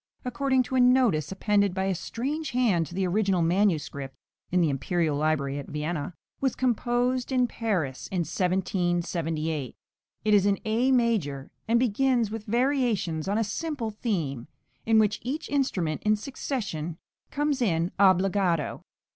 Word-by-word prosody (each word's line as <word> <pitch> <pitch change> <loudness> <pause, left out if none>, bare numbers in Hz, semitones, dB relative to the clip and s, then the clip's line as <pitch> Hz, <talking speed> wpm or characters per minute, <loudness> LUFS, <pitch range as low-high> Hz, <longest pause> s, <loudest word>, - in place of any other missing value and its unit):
according 260 +1 +1
to 255 - -8
a 260 - +3
notice 245 - +3
appended 200 -1 +1
by 190 - 0
a 195 - +1
strange 270 - -3
hand 225 - +2
to 175 - -10
the 190 0 0
original 190 -1 +1
manuscript 165 -7 0 0.3
(in 180 - +2
the 170 - +3
imperial 155 +3 0
library 145 -2 0
at 140 - -8
Vienna), 150 +1 -3 0.2
was 265 -2 0
composed 245 +1 0
in 255 -1 +3
Paris 190 - -2
in 185 -2 -1
1778. 170 - -1 0.5
It 215 - +3
is 200 -1 +5
in 200 -1 +2
A 230 +5 +2
major, 210 - +1 0.2
and 230 +1 +3
begins 245 -1 +2
with 220 -1 -5
variations 235 - 0
on 200 +2 +1
a 225 - +2
simple 240 +1 -3
theme, 165 - -3 0.4
in 225 -1 +5
which 215 -1 +3
each 275 +6 -4
instrument 190 - 0
in 215 0 +3
succession 205 - -4 0.3
comes 290 -2 -1
in 170 -5 +1
obbligato. 185 -4 +2
200 Hz, 145 wpm, -27 LUFS, 165-245 Hz, 0.5 s, is